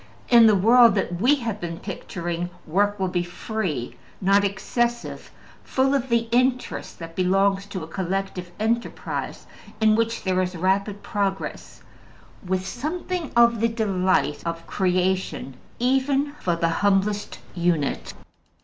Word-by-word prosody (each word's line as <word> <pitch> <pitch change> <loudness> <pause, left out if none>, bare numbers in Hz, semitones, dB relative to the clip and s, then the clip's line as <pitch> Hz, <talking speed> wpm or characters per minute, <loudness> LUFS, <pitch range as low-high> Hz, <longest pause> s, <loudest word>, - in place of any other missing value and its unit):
In 235 -2 +8
the 215 - +5
world 230 +4 +6
that 175 -3 -2
we 265 +6 +5
have 230 -6 -4
been 170 -1 -4
picturing, 175 -2 -4 0.2
work 205 +5 +1
will 190 - +1
be 180 -1 0
free, 175 - -4 0.2
not 195 +1 +4
excessive, 235 +4 -2 0.3
full 270 +1 +1
of 265 -2 0
the 230 -1 +2
interest 250 +1 0
that 165 -1 -9
belongs 195 +2 +2
to 185 -4 -5
a - - -7
collective 190 +1 -3
enterprise 230 +2 -2 0.3
in 215 -1 +4
which 230 +1 0
there 185 -1 +1
is 180 0 -2
rapid 195 +3 0
progress, 195 -2 -3 0.6
with 185 0 -1
something 320 - -4
of 235 -1 +5
the 230 - +4
delight 190 -9 +1
of 165 0 -4
creation 185 -7 -1 0.2
even 270 +3 +1
for 175 -2 0
the 170 0 +1
humblest 205 +1 +1 0.2
unit. 165 - -1
195 Hz, 135 wpm, -24 LUFS, 180-230 Hz, 0.6 s, In